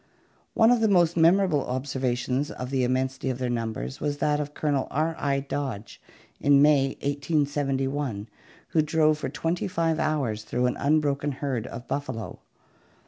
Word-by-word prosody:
One 225 +1 +5
of 245 - +4
the 220 - +4
most 175 -4 +3
memorable 170 -3 +4
observations 130 +1 -2
of 125 +1 -6
the 130 -2 +1
immensity 130 +1 -1
of 130 - -2
their 125 -1 -2
numbers 110 - -4
was 145 -1 -1
that 150 0 +1
of 150 0 -5
Colonel 145 -3 0
R. 160 +3 0
I. 140 -1 0
Dodge 135 -6 -5 0.4
in 140 -1 +5
May, 140 -2 +4
187 140 -2 0
1, 120 -8 -3 0.4
who 160 - +3
drove 155 0 +2
for - - -3
twenty 165 +2 -2
five 165 -3 0
hours 135 -9 -1
through 125 +3 -1
an 125 - 0
unbroken 145 -1 +1
herd 130 -4 -3
of 120 +1 -8
buffalo. 130 -6 -4
140 Hz, 160 wpm, -26 LUFS, 130-155 Hz, 0.4 s, One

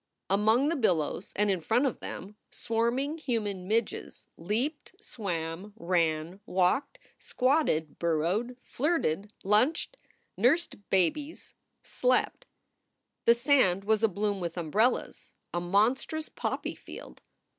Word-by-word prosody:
Among 220 +8 +3
the 335 - 0
billows 180 - 0
and 205 0 +2
in 185 -3 -1
front 235 - +2
of 260 - -1
them 200 +3 -7
swarming 245 +7 -1
human 210 -9 -2
midges 220 +1 -2
leaped, 245 - -3
swam, 180 - -5
ran, 170 -1 0
walked, 190 - +1 0.2
squatted, 255 - +1
burrowed, 175 +9 0
flirted, 215 - -1
lunched, 250 - +2 0.4
nursed 245 - +1
babies, 195 - 0 0.3
slept. - - 0 0.8
The 235 - +7
sand 235 -8 +3
was 215 +1 +2
abloom 205 -1 0
with 170 -1 -4
umbrellas, 205 +9 0 0.2
a 175 - -1
monstrous 235 - +1
poppy - - -3
field. - - -11
210 Hz, 110 wpm, -29 LUFS, 180-255 Hz, 0.8 s, The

